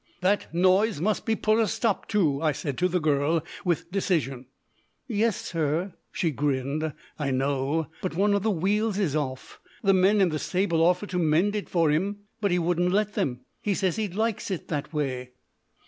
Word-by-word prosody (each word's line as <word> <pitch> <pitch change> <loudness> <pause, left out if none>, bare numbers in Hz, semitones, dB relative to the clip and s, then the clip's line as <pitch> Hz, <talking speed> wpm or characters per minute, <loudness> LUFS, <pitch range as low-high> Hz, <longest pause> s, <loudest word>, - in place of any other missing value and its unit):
"That 195 +3 +1
noise 185 +3 +3
must 210 +7 0
be 225 - +2
put 215 +1 +2
a 225 - +3
stop 215 +1 -1
to!" 160 -10 +1
I 155 -2 +2
said 140 0 -4
to 180 - +3
the 180 0 0
girl, 155 +1 +1 0.2
with 175 -2 -1
decision. 145 -10 -1 0.6
"Yes, 225 -2 +1
sir," 165 +3 -1 0.2
she 165 - 0
grinned, 145 +2 -1 0.3
"I 145 -2 -1
know; 135 +4 0 0.2
but 185 -3 -3
one 200 +3 +3
of 200 - +2
the 220 - +1
wheels 205 +3 +1
is 180 -8 0
off. 130 -3 -4 0.2
The 195 -1 +5
men 190 +3 +4
in 190 -3 +4
the 155 -1 -2
stable 180 -2 0
offered 180 +4 +2
to 180 - 0
mend 170 +6 +2
it 210 - -3
for 165 -4 +3
'im, 200 +7 -1 0.2
but 200 - +2
he 175 - +2
wouldn't 175 +1 +1
let 210 +2 +1
them. 125 -2 -1 0.2
He 205 -2 0
says 190 0 0
he 215 -1 0
likes 215 +3 -2
it 185 -4 -4
that 145 -2 -3
way." 130 -5 -3
175 Hz, 195 wpm, -26 LUFS, 150-200 Hz, 0.6 s, The